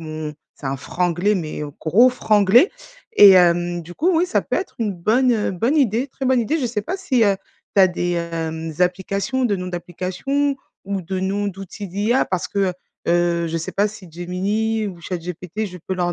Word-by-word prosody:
mon 155 -1 -6 0.2
c'est 140 - -8
un 135 +1 -1
franglais 175 +7 0
mais 155 -4 -4 0.2
gros 210 +11 +5
franglais. 215 - +4 0.4
Et 205 - +9
hem, 175 -1 +3
du 175 +2 -11
coup, 345 - +2
oui, 345 +3 +3
ça 365 - +1
peut - - -2
être 385 - -4
une 220 -3 -1
bonne, 235 +9 +2
heu, 215 -3 0
bonne 230 - 0
idée, 250 -3 +2
très 270 0 -7
bonne 255 -1 +3
idée. 295 +8 0
Je 265 - 0
sais 225 -3 -2
pas 360 - -3
si, 265 -12 +1
heu, 200 -1 +3 0.4
tu - - +7
as 185 - +8
des, 175 0 -2
hem, 165 -1 -3
applications, 195 +8 0
de 220 -4 +2
noms 180 0 -5
d'applications 185 - -2 0.3
ou 195 0 -2
de 185 +2 -3
noms 200 +2 -1
d'outils 195 +1 -8
d'IA, 210 +8 +1
parce 185 -2 -2
que 200 - -4
heu, 185 - 0 0.4
heu, 170 0 +2
je 165 - -2
sais 165 - -5
pas 205 +1 +2
si, 200 -5 -12
Gemini 205 +6 -1
ou 180 -3 -10
ChatGPT, 180 +4 -5
je 180 -2 -9
peux 190 +3 -4
leur 175 -1 0
190 Hz, 205 wpm, -21 LUFS, 175-225 Hz, 0.4 s, Et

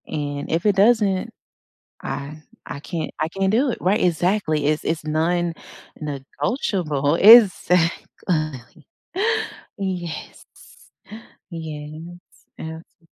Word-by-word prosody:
And 145 -2 -4
if 165 +4 0
it 205 -2 +4
doesn't, 200 -2 +3 0.7
I 145 +2 -5 0.3
I - - -6
can't 160 +2 -5
I 155 - +1
can't 195 +2 0
do 255 +6 +2
it, - - -4
right? 195 +4 +2
Exactly, 175 -3 +1
it's 155 0 0
it's 160 -1 -2
non-negotiable, 155 - -2
exactly. 170 - +4 0.9
Yes. 180 -4 -5 1.1
Yes 155 -1 -7 0.5
and, 160 +1 -7 0.2
too 165 - -29
165 Hz, 95 wpm, -22 LUFS, 150-190 Hz, 1.1 s, it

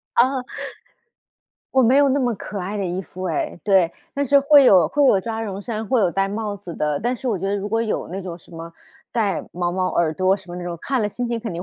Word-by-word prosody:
哦。 255 +2 +3 1.3
我 265 - +4
没 250 +3 +4
有 285 -1 +5
那 270 +1 +2
么 245 -3 +1
可 205 - -6
爱 195 +3 -4
的 - - -1
衣 180 +2 -3
服 185 0 -8
诶， 175 0 -2
对， 190 -5 +3 0.2
但 285 0 0
是 280 +2 +5
会 285 0 +7
有 180 -9 +6
会 290 - +3
有 200 -7 +4
抓 225 +2 -4
绒 200 -3 -5
衫， 220 0 -4
会 250 +2 +2
有 185 -4 +3
带 195 +2 0
帽 205 +1 -3
子 175 -3 -9
的， 150 -1 -1
但 240 +4 -1
是 255 +1 -4
我 215 -5 0
觉 190 - -3
得 200 - 0
如 205 0 -3
果 225 +2 +1
有 220 - -2
那 190 +3 -5
种 175 -2 -7
什 - - -21
么 165 0 -9 0.4
带 215 -5 0
毛 175 0 -1
毛 185 +1 0
耳 170 -2 +1
朵 185 +3 +3
什 190 -2 -11
么 175 - -6
那 180 - -6
种， 175 -1 -5
看 265 -4 -1
了 - - +1
心 245 +4 -4
情 235 -1 -2
肯 225 -3 -5
定 170 +1 -5
200 Hz, 285 characters per minute, -22 LUFS, 180-240 Hz, 1.3 s, 会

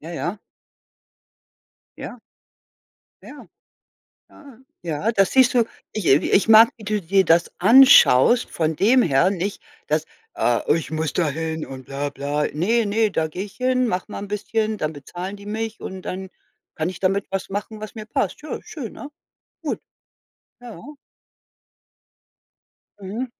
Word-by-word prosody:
Ja, 160 - -9
ja. 175 +4 -4 1.6
Ja. 245 - -8 1.0
Ja. - - -12 0.8
Ja. 275 -6 -16 0.2
Ja, 170 +7 -2
da 195 -2 +4
siehst 255 +5 +3
du, 235 -2 +4 0.3
ich 215 -5 -4
äh, 135 - +6
ich 190 +7 +1
mag, 225 +1 +8
wie 220 - -13
du 210 0 -1
dir 190 +2 +2
das 170 0 +3
anschaust 240 - +6
von 160 -1 -1
dem 240 - +4
her, 165 - +3
nicht, 195 +1 -4 0.2
dass, 155 +1 0 0.3
äh 120 -1 +1 0.2
„ich 165 - -5
muss 160 -1 -2
da 165 -4 +1
hin 160 +1 -4
und 130 -1 -9
bla 140 +1 -4
bla.“ 145 +2 -2
„Ne, 220 +10 +1
ne, 215 +1 +1
da 160 -4 -1
gehe 180 +5 -5
ich 205 - -13
hin, 255 0 +1
mache 185 -1 -3
mal - - -5
'n 205 - -7
bisschen, 215 +1 -2
dann 155 -2 -2
bezahlen 175 +7 -7
die 200 0 -14
mich 220 +1 -4
und 190 -1 -7
dann 190 +1 -6 0.5
kann 160 +1 -2
ich 185 - -10
damit 195 +1 0
was 195 -1 -3
machen, 210 +2 -5
was 215 -1 -8
mir 215 -2 -8
passt.“ 270 +4 -2
Ja, 305 - -5
schön, 270 -9 -8
ne? 290 - -9 0.5
Gut. - - -3 0.8
Ja. 240 -2 -11 2.2
Mhm. 205 +7 -5
195 Hz, 155 wpm, -22 LUFS, 160-225 Hz, 2.2 s, mag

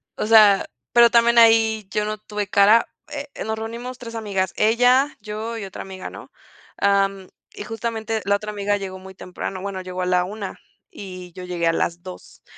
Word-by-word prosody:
O - - -2
sea, 210 -3 +6 0.3
pero 235 0 +7
también 235 0 +4
ahí 225 -2 +5
yo 210 0 0
no 215 0 -3
tuve 210 -1 -5
cara. 205 +4 +5 0.2
Eh, 290 0 -5 0.2
nos 220 0 -2
reunimos 235 +3 -6
3 230 -2 -9
amigas, 195 -5 -2
ella, 245 +6 +3
yo 215 +2 -5
y 210 - -5
otra 190 - -8
amiga, 190 -1 -8
¿no? - - -12 0.5
Am, 195 -1 +1 0.3
y - - -7
justamente 225 0 -3
la 200 0 +3
otra 210 +1 -6
amiga 205 0 -1
llegó 190 -1 -6
muy 190 0 -12
temprano. 185 0 -6
Bueno, 195 -1 -5
llegó 185 0 -6
a - - -1
la 180 0 +2
1:00 195 +1 -6 0.4
y 185 -2 -9
yo 185 - -9
llegué 175 -2 -3
a 165 - +3
las 170 +1 -2
2:00, 185 -1 -12
205 Hz, 190 wpm, -22 LUFS, 190-225 Hz, 0.5 s, pero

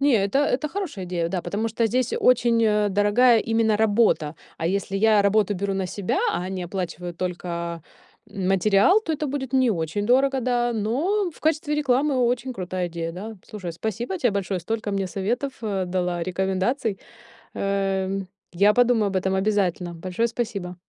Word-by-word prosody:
Не, 280 -2 +4
это 200 +7 +1
это 290 +1 0
хорошая 325 - -4
идея, 175 -2 -2
да, 180 -1 -3
потому 205 +6 -2
что 230 +1 0
здесь 250 +2 0
очень, 240 -2 +3
а, 210 -1 +2
дорогая 205 +5 +4
именно 225 -1 +1
работа. 205 -8 +2 0.2
А 165 - -2
если 195 +2 -1
я 215 0 +4
работу 205 0 +2
беру 195 +1 -2
на 190 -1 -1
себя, 185 +1 -2
а - - -2
они 185 0 -4
оплачивают 175 -1 -5
только 170 -2 -4 0.5
материал, 195 - +3
то 325 -7 -3
это 300 0 -2
будет 265 -2 -4
не 260 -2 +3
очень 165 +1 -2
дорого, 265 +2 +3
да, 240 -1 +1
но 330 - 0
в - - -18
качестве 305 -1 0
рекламы 280 0 +1
очень 250 +1 0
крутая 185 -3 -3
идея, 165 -1 -4
да. 215 +5 -7
Слушай, 185 -5 -6
спасибо 220 - -4
тебе 245 -6 +2
большое, 195 -2 -2
столько 215 +4 -3
мне 195 -1 -1
советов, 235 +9 -2
э, 195 -4 -1
дала, 180 -1 -1
рекомендаций, 190 +5 -1 0.6
эм. 195 -1 -1 0.3
Я 200 +4 +4
подумаю 245 -3 +3
об 195 - -3
этом 190 +1 0
обязательно. 190 -3 0
Большое 185 +7 -1
спасибо! 210 -6 -4
205 Hz, 170 wpm, -24 LUFS, 185-245 Hz, 0.6 s, Не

